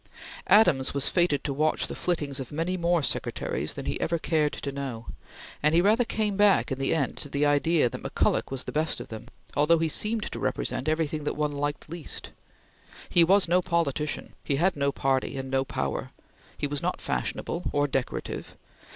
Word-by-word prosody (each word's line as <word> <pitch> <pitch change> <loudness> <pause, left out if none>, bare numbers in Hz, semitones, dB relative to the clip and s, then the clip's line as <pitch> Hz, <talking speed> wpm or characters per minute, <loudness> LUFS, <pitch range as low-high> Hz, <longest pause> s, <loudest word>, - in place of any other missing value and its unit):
Adams 170 -12 +4
was 140 0 +2
fated 175 -5 +2
to 140 - -1
watch 155 +3 +1
the - - -6
flittings 150 -6 -2
of 130 - -6
many 165 +5 -1
more 170 -2 +1
Secretaries - - -2
than - - -6
he - - -2
ever 170 - +1
cared 155 -2 +1
to 140 - -5
know, 135 -5 -5 0.6
and 155 +2 +3
he - - +6
rather 215 +6 +4
came 215 -3 -1
back 205 -5 +4
in 135 - -2
the 135 - 0
end 140 -5 0
to 145 - -6
the 145 +1 +1
idea 145 0 +3
that - - -6
McCulloch - - 0
was 135 -1 -4
the - - -6
best 155 +1 0
of - - -8
them, 110 -1 -8 0.3
although 150 +4 +4
he 165 0 +1
seemed 215 +7 0
to - - -5
represent 140 - -1
everything 155 -1 -1
that 150 - -2
one 150 -1 0
liked 145 0 -3
least. 165 -1 -6 0.8
He 175 - +7
was 195 +3 +5
no 180 +2 +3
politician, 155 -4 -1
he 140 - 0
had 180 +6 +2
no 140 -1 +1
party, 135 0 0
and 135 0 -5
no 135 0 +2
power. 70 - -3 0.5
He - - -1
was 145 0 -2
not - - -1
fashionable 65 - -2
or 145 0 +2
decorative. 135 -3 -3
150 Hz, 195 wpm, -27 LUFS, 140-170 Hz, 0.8 s, He